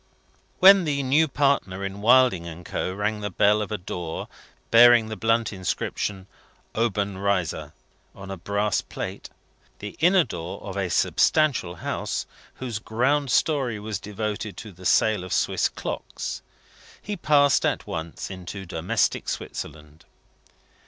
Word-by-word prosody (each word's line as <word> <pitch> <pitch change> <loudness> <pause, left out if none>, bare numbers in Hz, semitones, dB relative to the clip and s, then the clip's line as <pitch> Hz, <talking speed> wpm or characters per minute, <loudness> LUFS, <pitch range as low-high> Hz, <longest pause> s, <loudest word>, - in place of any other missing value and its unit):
When 195 0 +8
the 140 -2 0
new 145 +5 +3
partner 135 -10 0
in 100 +1 -6
Wilding 120 -7 +4
and 85 +1 -9
Co. - - -3
rang 105 +2 -2
the 105 0 -3
bell 105 +3 +3
of 105 - -4
a 105 - -1
door 90 -3 -5 0.4
bearing 120 -1 +7
the 110 - -4
blunt 115 0 +1
inscription 95 +1 -3 0.5
OBENREIZER 100 -5 -1 0.4
on 100 0 -9
a - - -3
brass 100 +3 -1
plate - - -7 0.5
the 105 0 -8
inner 180 +2 +5
door 85 - -6
of 100 -1 -6
a 95 -2 -1
substantial 135 - +2
house, - - -3 0.3
whose 120 -5 -4
ground 130 +6 0
story 130 -4 +1
was 105 -2 -4
devoted 105 0 -4
to 110 - -8
the 90 0 -5
sale 110 -4 +3
of 90 - -8
Swiss - - +1
clocks - - -5 0.6
he 210 - -5
passed 145 -6 +3
at - - 0
once 80 +4 -5
into 95 +1 -7
domestic 85 0 -1
Switzerland. 75 0 -7
105 Hz, 140 wpm, -25 LUFS, 95-125 Hz, 0.6 s, When